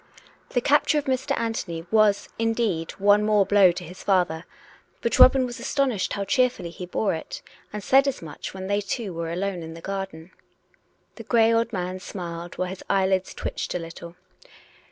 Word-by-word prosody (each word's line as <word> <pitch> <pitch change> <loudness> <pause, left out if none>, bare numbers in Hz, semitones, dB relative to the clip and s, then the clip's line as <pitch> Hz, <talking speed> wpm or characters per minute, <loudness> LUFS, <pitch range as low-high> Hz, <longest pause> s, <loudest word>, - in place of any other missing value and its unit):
The 245 - 0
capture 295 +3 +3
of 295 - -1
Mr. 265 +1 0
Anthony 190 -8 -3
was, 215 -2 +3
indeed, 225 -8 0
one 205 +1 +4
more 210 -2 +3
blow 200 -3 +6
to 180 +1 -7
his 180 +2 -10
father; 180 -4 +1 0.5
but 235 - -1
Robin 260 0 +7
was 245 -1 -6
astonished 260 -9 0
how 200 - -2
cheerfully 250 -7 +1
he 180 +1 -8
bore 195 +3 0
it; 160 - -6 0.3
and 210 -1 -6
said 270 +1 +5
as 275 - -1
much 155 -3 -8
when 190 0 -7
they 200 +1 0
two 200 -1 -4
were 165 0 -4
alone 185 +1 -2
in 160 0 -8
the - - -9
garden. 190 -2 -6 0.9
The - - -8
grey 230 -1 +3
old 230 +1 +1
man 185 -2 -3
smiled, 175 -3 -7
while 185 0 -1
his 190 +1 -8
eyelids 190 -1 +1
twitched - - -4
a - - +2
little. 170 0 -9
195 Hz, 180 wpm, -25 LUFS, 175-230 Hz, 0.9 s, Robin